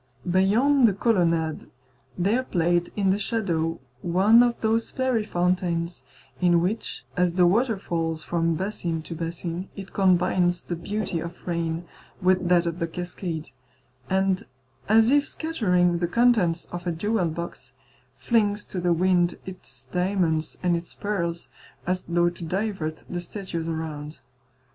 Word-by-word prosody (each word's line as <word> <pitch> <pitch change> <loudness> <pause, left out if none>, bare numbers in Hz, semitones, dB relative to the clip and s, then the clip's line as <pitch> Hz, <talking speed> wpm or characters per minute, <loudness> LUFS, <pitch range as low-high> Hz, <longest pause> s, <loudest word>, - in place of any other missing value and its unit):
Beyond 230 +9 +4
the 200 - +1
colonnade 170 -8 +1 0.5
there 205 +8 +2
played 175 -6 0
in 195 -2 +2
the 200 - +1
shadow 170 -7 -1 0.2
one 195 +7 +5
of 240 -1 +2
those 225 +1 +1
fairy 260 -4 0
fountains 175 -3 0 0.4
in 175 -2 +4
which, 195 +6 -2
as 180 -2 +2
the 180 0 +4
water 225 +5 +2
falls 165 -4 -2
from 165 -1 0
basin 170 -3 -2
to 165 - -7
basin, 170 +2 -4
it 195 -1 -9
combines 180 -2 +2
the 175 - -4
beauty 190 0 -3
of 170 +1 -8
rain 170 -1 -2 0.3
with 185 -1 +2
that 175 -1 +4
of 170 0 -3
the 165 - 0
cascade, 175 -1 -5 0.6
and 190 0 +1 0.4
as 225 +2 +5
if 290 0 +4
scattering 180 - +1
the 175 - 0
contents 205 -5 +3
of 175 +1 -5
a - - +1
jewel 195 +2 0
box, 160 -5 -6 0.4
flings 210 -3 +1
to 180 - -5
the 175 -1 +3
wind 175 0 +2
its 135 -9 -10
diamonds 180 -3 0
and 175 -1 +3
its 170 0 -5
pearls 170 -5 -2 0.4
as 180 +1 -1
though 175 0 +2
to 175 - -10
divert 180 -3 -3
the 175 - -4
statues 175 -2 -4
around. 155 -2 -5
180 Hz, 145 wpm, -25 LUFS, 170-200 Hz, 0.6 s, one